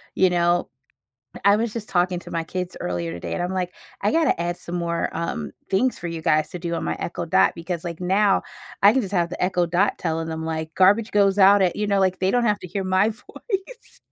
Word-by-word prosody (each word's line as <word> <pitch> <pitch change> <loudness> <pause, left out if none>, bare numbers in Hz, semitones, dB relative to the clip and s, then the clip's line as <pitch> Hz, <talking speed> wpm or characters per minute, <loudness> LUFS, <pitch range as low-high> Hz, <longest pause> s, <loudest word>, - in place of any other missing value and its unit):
you 185 - +4
know? 175 0 +1 0.8
I 200 +1 +7
was 225 0 -1
just 225 -2 -5
talking 180 0 +1
to - - -12
my 165 -1 -1
kids 180 +2 -5
earlier 85 -2 -3
today, 85 +1 -5
and 175 - -2
I'm, 180 +2 -2
like, 180 -1 -2 0.3
"I 205 - +2
gotta 320 - +2
add 175 +1 -2
some 170 - -9
more," 170 -1 -1
um, 120 - -3 0.2
"things 245 +7 +1
for 175 - -5
you 165 -1 -4
guys 155 0 +2
to - - -6
do 170 0 -3
on - - -2
my - - -2
Echo 170 0 -4
Dot." 165 - +4
Because, 170 0 -5
like, 170 -1 -6
now 195 +2 +2 0.4
I 200 +1 +8
can 265 - +2
just 195 - -6
have 170 -2 +1
the 180 - -3
Echo 180 -1 +1
Dot 180 +4 +1
telling 165 -1 -2
'em, 160 0 -4
like, 160 0 -4
"Garbage 205 +4 +4
goes 200 -1 +3
out 200 +1 +6
at" 180 -2 +2
you 210 - -1
know? 200 -1 +2
like, 185 -1 +2
they 190 +1 +1
don't 245 -1 +2
have 210 -2 +2
to 180 - -8
hear 195 +3 -3
my 185 +3 +2
voice. 395 - -7
180 Hz, 240 wpm, -23 LUFS, 170-200 Hz, 0.8 s, I